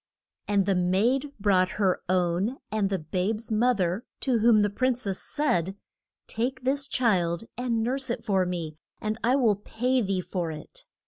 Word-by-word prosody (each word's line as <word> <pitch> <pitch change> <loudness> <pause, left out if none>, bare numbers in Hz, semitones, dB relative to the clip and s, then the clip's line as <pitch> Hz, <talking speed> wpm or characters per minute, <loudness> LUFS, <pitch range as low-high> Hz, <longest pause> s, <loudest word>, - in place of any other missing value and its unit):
And 200 -2 +2
the 195 - +2
maid 210 +11 +1
brought 190 -2 +2
her 190 -3 +1
own 185 +6 +1
and 210 -2 +1
the 195 - 0
babe's 190 +8 -2
moth 230 0 +2
er, 180 +6 0 0.2
to 250 -4 +2
whom 220 -1 +5
the 205 - +2
prin 255 +4 +1
cess 200 -6 -3
said, 195 - 0 0.5
Take 255 +3 -3
this 275 +2 +1
child 185 -9 +1
and 235 -2 -1
nurse 260 +2 -1
it 230 -1 -3
for 195 -4 +2
me, 165 -4 -4 0.2
and 215 +1 -3
I 245 +3 +3
will 235 -7 +3
pay 250 +5 0
thee 195 -3 -1
for 175 -2 -3
it. 155 -1 -9
210 Hz, 175 wpm, -27 LUFS, 185-245 Hz, 0.5 s, whom